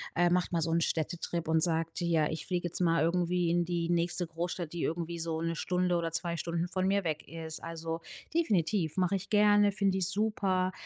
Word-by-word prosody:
äh, 175 +1 +4
macht 180 0 +1
mal 165 - +2
so 165 +1 0
'n 165 - +3
Städtetrip 170 0 -2
und 160 0 +3
sagt: 165 0 0
„Ja, 165 -3 +2
ich 155 -1 -5
fliege 175 -1 -1
jetzt - - -6
mal 165 -3 +3
irgendwie 175 0 +1
in 175 0 +2
die 170 -1 -1
nächste 175 +1 +1
Großstadt, 170 0 -4
die 170 - -3
irgendwie 170 +1 -2
so 160 -1 -2
1 165 0 -2
Stunde 180 0 +1
oder 165 -1 -2
2 170 0 -1
Stunden 170 +2 -2
von 185 0 0
mir 200 0 +2
weg 155 -2 -3
ist.“ 160 -1 -6
Also, 165 0 -4 0.3
definitiv, 195 - +1
mache 185 +1 +2
ich 190 - -9
gerne, 205 -1 +5
finde 195 -2 +1
ich 185 -2 +1
super, 190 -2 +1
170 Hz, 210 wpm, -31 LUFS, 165-185 Hz, 0.3 s, gerne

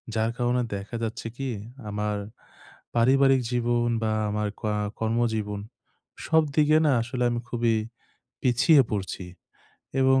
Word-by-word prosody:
যার 110 +1 +1
কারণে 125 0 +1
দেখা 100 +4 -6
যাচ্ছে 115 +1 -4
কি, 135 -1 -3 0.4
আমার 105 0 -1 0.8
পারিবারিক 135 +2 +4
জীবন 120 -1 +1 0.2
বা 110 - +1 0.2
আমার 105 0 -1
কা 105 -1 0 0.3
কর্মজীবন 110 -3 0 0.7
সবদিকে 155 -1 +4
না 150 - +4
আসলে 125 +2 -2
আমি 120 - -1
খুবই 115 -1 +1 0.7
পিছিয়ে 135 +3 +5
পড়ছি 95 -2 -3 0.8
এবং 130 0 +5
120 Hz, 120 wpm, -26 LUFS, 110-130 Hz, 0.8 s, পিছিয়ে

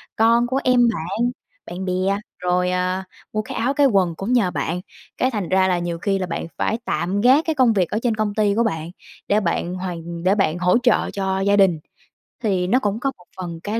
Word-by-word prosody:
con 230 +2 +4
của 260 +2 0
em 250 -1 +4
bạn, 215 +8 -1 0.3
bạn 185 +2 -6
bè, 185 - -1 0.5
rồi, 180 0 +1
à, 185 +1 -1 0.3
mua 215 - 0
cái 215 - -7
áo, 255 +4 +1
cái 285 -1 +4
quần 190 -8 +2
cũng 195 +8 -2
nhờ 215 -8 +3
bạn, 175 +1 -2 0.4
cái 255 - +1
thành 205 -8 -3
ra 190 0 +3
là 180 -1 +1
nhiều 170 -1 -3
khi 195 +2 0
là 185 - -1
bạn 165 - -4
phải 220 - 0
tạm 195 +4 -1
gác 265 +7 +5
cái 320 - 0
công 255 -5 +4
việc 185 -5 +1
ở 215 - -1
trên 235 -3 +1
công 215 -1 -1
ty 205 -1 +1
của 230 - +3
bạn 160 -7 -2 0.4
để 205 - +3
bạn 175 -2 -1
hoàn 170 -2 -6
để 190 +2 +3
bạn 185 -5 +1
hỗ 180 +3 +3
trợ 245 -3 +2
cho 190 -1 -1
gia 200 +1 +2
đình. 190 -5 +4 0.6
Thì 190 -4 +1
nó 245 +7 +3
cũng 210 -3 -1
có 275 +2 -1
một 180 - -19
phần 175 -3 -6
cái 215 +2 -2
195 Hz, 230 wpm, -21 LUFS, 180-225 Hz, 0.6 s, gác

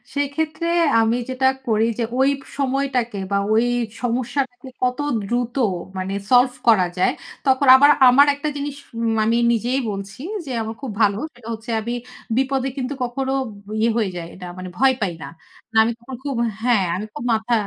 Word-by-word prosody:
সেক্ষেত্রে 310 +4 -1 0.3
আমি 225 +1 +2
যেটা 260 0 +1 0.2
করি 220 -1 +3
যে - - +1 0.2
ওই 265 +1 +5
ব - - -15 0.2
সময়টাকে 265 -5 -1
বা 200 - +2 0.2
ওই 225 +2 +4 0.4
সমস্যাটাকে 250 +2 -2
কত 250 0 +1 0.3
দ্রুত 240 +3 -2 0.4
মানে, 190 +1 -3 0.2
সলভ 250 0 +5
করা 210 -6 +6
যায়। 180 - +3 0.4
তখন 265 +1 +3
আবার 285 +2 +7 0.2
আমার 280 +4 +6
একটা 285 +2 -3
জিনিস 285 0 -4 0.4
মানি 225 +2 +2 0.2
নিজেই 245 +4 0
বলছি 200 +3 -7 0.2
যে, 270 - -6
আমার 220 0 -5
খুব 270 -5 -4
ভালো। 200 -2 +3 0.2
সেটা 240 -2 -15
হচ্ছে 225 +2 -7
আমি 235 +2 -3 0.4
বিপদে 270 0 +1
কিন্তু 260 +1 -2
কখনো 265 +2 -2 0.4
ব - - -13
ইয়ে 225 +2 +3
হয়ে 215 -4 +1
যাই 170 -1 -6
না, 180 - -6
মানে 185 0 -6
ভয় 265 +1 +4
পাই 190 -4 0
না। - - -6 0.5
না - - 0
আমি 225 - 0
কখনো 255 +2 -8
খুব 280 -2 -2 0.3
হ্যাঁ, 235 -4 +3
আমি 200 +4 -4
খুব - - -6
মাথা 220 +2 0
245 Hz, 175 wpm, -21 LUFS, 220-265 Hz, 0.5 s, আবার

